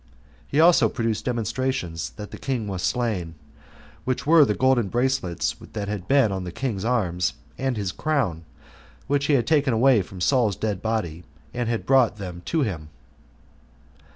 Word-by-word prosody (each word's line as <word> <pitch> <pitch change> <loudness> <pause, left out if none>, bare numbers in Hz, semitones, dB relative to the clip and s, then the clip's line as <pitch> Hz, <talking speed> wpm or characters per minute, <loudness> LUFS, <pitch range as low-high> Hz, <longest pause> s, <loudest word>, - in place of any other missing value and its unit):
He 145 - 0
also 170 +2 +6
produced 115 -3 -2
demonstrations 115 - -2
that 105 - -8
the - - -9
king 125 -6 -2
was 95 -2 -4
slain, 100 -10 -1 0.7
which 130 -1 -2
were 160 +1 +7
the 105 - 0
golden 130 -1 +3
bracelets 120 -6 0 0.2
that 105 -2 -3
had 100 -3 -4
been 135 -6 +4
on 95 -1 -3
the 90 - -6
king's 105 -2 -3
arms, 90 - 0 0.2
and 130 -3 -2
his 100 -3 -2
crown, 115 - -1 0.6
which 140 0 0
he 150 - +3
had 125 -4 +3
taken 150 -5 +2
away 120 -1 +4
from 95 0 -9
Saul's 115 0 +2
dead 105 -3 -2
body, 90 -7 -2 0.3
and 120 -2 -2
had 115 -1 -2
brought 130 -5 +4
them 90 -4 -7
to 165 - +1
him. 85 - -3
115 Hz, 165 wpm, -24 LUFS, 95-130 Hz, 0.7 s, were